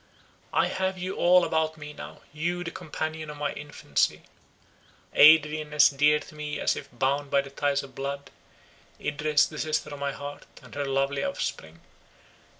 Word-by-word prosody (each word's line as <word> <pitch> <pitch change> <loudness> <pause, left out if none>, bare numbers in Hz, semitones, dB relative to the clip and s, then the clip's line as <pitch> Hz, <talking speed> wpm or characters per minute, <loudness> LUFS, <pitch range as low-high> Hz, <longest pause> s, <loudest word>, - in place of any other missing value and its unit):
I - - +3
have 190 0 -1
you 185 +1 -4
all 180 0 +5
about 160 0 0
me 150 -1 -8
now—you, 170 +4 -5
the 165 - -5
companion 155 -2 -5
of 150 - -8
my 145 0 -2
infancy; 145 - -1 0.9
Adrian, 150 0 +6
as 150 - +7
dear 145 +2 +3
to - - -13
me 150 -1 -5
as - - +1
if - - -8
bound 135 +3 0
by 140 0 +3
the 140 0 -11
ties 140 0 0
of 135 -1 -12
blood; 140 +1 -5 0.7
Idris, 150 0 +2
the 155 - -8
sister 155 -1 -1
of 145 - -7
my 140 0 -1
heart, 145 +1 -8 0.2
and - - -14
her 145 0 -2
lovely 135 +1 0
offspring. 80 +1 -4
150 Hz, 165 wpm, -27 LUFS, 140-155 Hz, 0.9 s, as